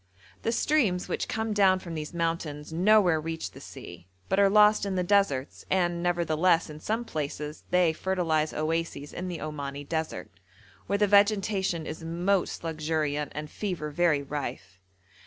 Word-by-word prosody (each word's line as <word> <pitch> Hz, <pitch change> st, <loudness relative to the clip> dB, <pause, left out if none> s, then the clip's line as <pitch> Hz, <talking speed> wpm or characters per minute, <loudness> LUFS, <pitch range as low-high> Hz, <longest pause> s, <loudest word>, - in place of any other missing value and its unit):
The 230 Hz, -, 0 dB
streams 230 Hz, -8 st, +1 dB
which -, -, -2 dB
come 220 Hz, -1 st, -2 dB
down 195 Hz, -2 st, +4 dB
from 175 Hz, -2 st, -8 dB
these 155 Hz, -1 st, -5 dB
mountains 165 Hz, -3 st, -3 dB
nowhere 180 Hz, -2 st, +4 dB
reach 160 Hz, +1 st, -4 dB
the -, -, -13 dB
sea, 85 Hz, +2 st, -11 dB, 0.2 s
but 190 Hz, -, +2 dB
are 200 Hz, -1 st, +6 dB
lost 210 Hz, +1 st, +5 dB
in 200 Hz, -2 st, -1 dB
the 180 Hz, -, +1 dB
deserts, 175 Hz, -9 st, +1 dB
and, 175 Hz, -2 st, +1 dB
nevertheless, 170 Hz, -1 st, +2 dB
in 150 Hz, -, -9 dB
some 225 Hz, +8 st, -2 dB
places 150 Hz, -3 st, -5 dB
they 180 Hz, -2 st, +3 dB
fertilise 165 Hz, -4 st, 0 dB
oases 160 Hz, -2 st, -2 dB
in 185 Hz, -, -4 dB
the 175 Hz, -2 st, -4 dB
Omani 145 Hz, -2 st, -5 dB
desert, 160 Hz, 0 st, -3 dB, 0.6 s
where 200 Hz, -, +1 dB
the 210 Hz, -, +4 dB
vegetation 200 Hz, -4 st, +2 dB
is 160 Hz, -, -6 dB
most 175 Hz, +4 st, 0 dB
luxuriant 155 Hz, -2 st, -1 dB
and 150 Hz, 0 st, -5 dB
fever 175 Hz, -7 st, -4 dB
very 155 Hz, -2 st, +2 dB
rife. 100 Hz, -10 st, -6 dB
170 Hz, 155 wpm, -28 LUFS, 155-190 Hz, 0.6 s, are